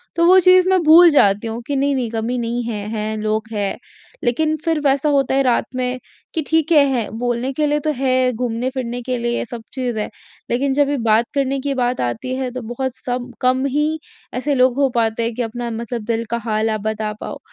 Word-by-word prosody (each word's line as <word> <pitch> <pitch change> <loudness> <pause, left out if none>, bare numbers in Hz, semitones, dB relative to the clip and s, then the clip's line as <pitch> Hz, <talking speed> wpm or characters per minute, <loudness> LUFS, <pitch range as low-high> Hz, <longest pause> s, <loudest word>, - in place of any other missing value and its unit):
तो 335 - +3
वो 370 +2 +7
चीज़ 365 0 +5
मैं 375 -1 +4
भूल 330 +2 +8
जाती 205 -7 +3
हूँ 225 +1 -4
कि 285 - -1
नहीं-नहीं 270 -4 0
कमी 230 +2 -2
नहीं 240 +1 -2
है, 210 -3 -4
हैं 215 0 -2
लोग 215 0 -1
हैं। 205 -3 -2 0.5
लेकिन 310 +6 +1
फिर 325 -2 +1
वैसा 280 +2 +3
होता 275 -2 +2
है 275 - +3
रात 245 -3 +2
में 255 0 -2 0.3
कि 325 - 0
ठीक 320 +1 +1
है, 295 -3 +7
है। 245 -5 -1
बोलने 245 +2 -1
के 300 +2 0
लिए 295 0 +1
तो 305 +1 -1
है 255 -1 +2
घूमने 240 +1 -2
फिरने 245 -2 -4
के 250 +1 -2
लिए 235 0 -1
सब 235 -1 -8
चीज़ 250 -4 -2
है, 210 - -3 0.4
लेकिन 270 +3 +1
जब 285 0 +3
भी 285 - 0
बात 220 +2 +4
करने 275 -1 0
की 280 +1 -2
बात 250 -1 -1
आती 120 - -2
है 260 -1 -3
तो 255 +1 -5
बहुत 260 0 -3
सब 245 0 -4
कम 255 +1 +2
ही 300 +3 0 0.3
ऐसे 275 +3 -1
लोग 250 -1 +3
हो 275 -1 +3
पाते 230 0 +1
कि 245 - -4
अपना 235 +1 -4
मतलब 235 0 -4
दिल 230 0 -1
का 235 - +1
हाल 220 0 0
आप 215 -2 -2
बता 215 0 -2
पाओ। - - -6
250 Hz, 225 wpm, -19 LUFS, 230-275 Hz, 0.5 s, भूल